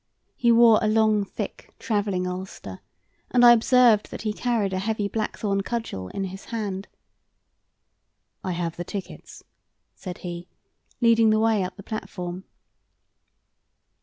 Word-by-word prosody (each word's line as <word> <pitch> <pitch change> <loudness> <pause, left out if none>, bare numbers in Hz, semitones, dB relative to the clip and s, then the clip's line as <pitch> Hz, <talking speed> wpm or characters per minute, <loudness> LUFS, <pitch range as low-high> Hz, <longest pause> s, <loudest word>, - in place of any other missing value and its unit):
He 235 -1 +3
wore 230 -1 +6
a 215 - +1
long, 215 -1 +3
thick 200 - -7
travelling 205 -5 -1
ulster, 180 - -6 0.5
and 245 -1 +5
I 240 - +10
observed 235 -2 +4
that - - -7
he 215 -1 -1
carried 220 -5 -1
a 185 - -1
heavy 210 +1 -1
blackthorn 205 -2 -2
cudgel 210 - -4
in 195 - -4
his 190 +1 -7
hand. 205 -4 -4 1.6
"I 185 - -2
have 170 -1 -3
the 175 - -3
tickets," 195 +2 -8 0.5
said 180 -3 -8
he, 175 0 -6 0.5
leading 230 -1 +5
the 215 0 +3
way 220 -3 +2
up 180 0 -5
the 200 - -10
platform. 185 -4 -6
205 Hz, 135 wpm, -25 LUFS, 185-225 Hz, 1.6 s, I